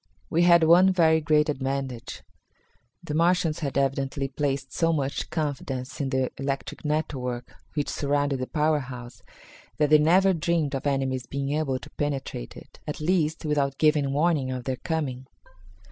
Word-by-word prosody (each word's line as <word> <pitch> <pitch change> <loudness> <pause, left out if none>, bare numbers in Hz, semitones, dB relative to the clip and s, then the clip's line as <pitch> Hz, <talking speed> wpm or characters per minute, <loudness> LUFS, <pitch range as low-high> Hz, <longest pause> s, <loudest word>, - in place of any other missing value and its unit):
We 165 - +3
had 170 -1 +6
one 175 +4 +6
very 160 -3 +4
great 150 -1 +3
advantage. 135 -4 -3 0.8
The - - -5
Martians 170 0 +2
had 140 -3 -3
evidently 135 0 0
placed 135 -1 -2
so 165 0 +2
much 140 -3 -2
confidence 145 -4 -3
in 135 - -1
the 130 -1 0
electric 135 +3 -4
network 135 -5 -3 0.2
which 145 -2 -1
surrounded 145 -1 0
the 130 - -3
power 155 0 +1
house 125 -2 -9 0.6
that 150 -1 +2
they 155 - +8
never 185 +5 +4
dreamed 165 -3 0
of 135 +1 -2
enemies 135 -2 -1
being 140 0 -3
able 145 -3 0
to 145 +3 -12
penetrate 135 - -4
it - - -14
at 150 - -4
least, 160 -1 0
without 140 -2 0
giving 150 -3 +3
warning 145 -2 +1
of 130 -1 -4
their 130 0 -2
coming. 135 -6 -3
145 Hz, 160 wpm, -26 LUFS, 135-155 Hz, 0.8 s, they